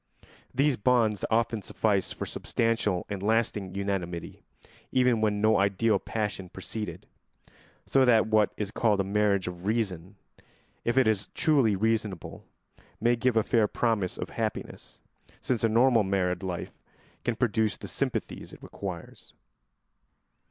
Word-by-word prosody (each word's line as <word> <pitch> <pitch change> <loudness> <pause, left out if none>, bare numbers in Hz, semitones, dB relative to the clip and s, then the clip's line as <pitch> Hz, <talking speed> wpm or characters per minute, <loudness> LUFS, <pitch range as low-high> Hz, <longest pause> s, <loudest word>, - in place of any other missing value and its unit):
These 135 0 +2
bonds 110 -3 +2
often 115 -1 +1
suffice 100 0 0
for - - -5
substantial 110 -5 -1
and 100 -2 -5
lasting 105 -3 0
unanimity, 95 -4 -3 0.5
even 125 -3 +3
when 105 -1 +1
no 110 +1 +4
ideal 100 +1 +2
passion 105 -4 -3
preceded; 105 +3 -6 0.8
so 135 - +3
that 120 -3 +5
what 110 -2 +3
is 105 -1 -3
called 110 -3 +2
a - - +3
marriage 100 -1 +1
of 90 +1 -6
reason, 100 -4 -2 0.7
if 120 +2 0
it 130 -3 +5
is 105 -2 +1
truly 140 - +3
reasonable, 105 -3 -2 0.6
may 120 +2 +3
give 120 0 +1
a 110 - +4
fair 110 -1 +2
promise 105 -5 0
of - - -5
happiness, - - -5 0.4
since 120 -3 -1
a 115 - +4
normal 120 +1 +4
married 95 -2 0
life 90 -3 -4 0.5
can 120 - 0
produce 110 -1 +1
the - - -8
sympathies - - -3
it - - -13
requires. 90 -4 -8
105 Hz, 140 wpm, -28 LUFS, 95-115 Hz, 0.8 s, that